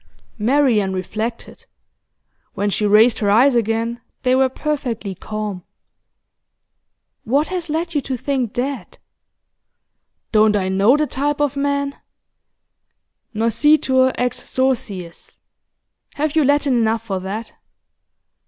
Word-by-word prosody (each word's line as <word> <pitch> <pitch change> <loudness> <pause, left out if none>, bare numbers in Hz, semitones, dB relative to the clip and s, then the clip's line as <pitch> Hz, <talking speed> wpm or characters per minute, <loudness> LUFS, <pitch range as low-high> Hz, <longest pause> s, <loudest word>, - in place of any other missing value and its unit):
Marian 225 -5 +2
reflected. 220 +5 -5 0.9
When 205 0 -1
she 210 +1 0
raised 220 +4 +5
her 205 - +1
eyes 250 +7 +5
again 230 +1 -1 0.2
they 255 -1 +2
were 265 0 +3
perfectly 255 -8 -3
calm. 210 -1 -5 1.6
'What 280 +7 +1
has 360 -3 -4
led 330 +2 -2
you 295 - +1
to 260 -1 -4
think 255 -3 -2
that?' 270 +3 -4 1.3
'Don't 215 -1 +4
I 190 -2 0
know 200 +8 +4
the 305 - +1
type 290 +1 -2
of 290 -2 0
man? 280 0 -1 1.4
Noscitur 260 +3 +3
ex 250 0 -1
sociis 210 -10 -3 0.8
have 305 +1 -1
you 315 - +4
Latin 285 -2 +2
enough 225 0 +1
for 195 -4 -2
that? 200 +5 -6
245 Hz, 115 wpm, -20 LUFS, 215-280 Hz, 1.6 s, raised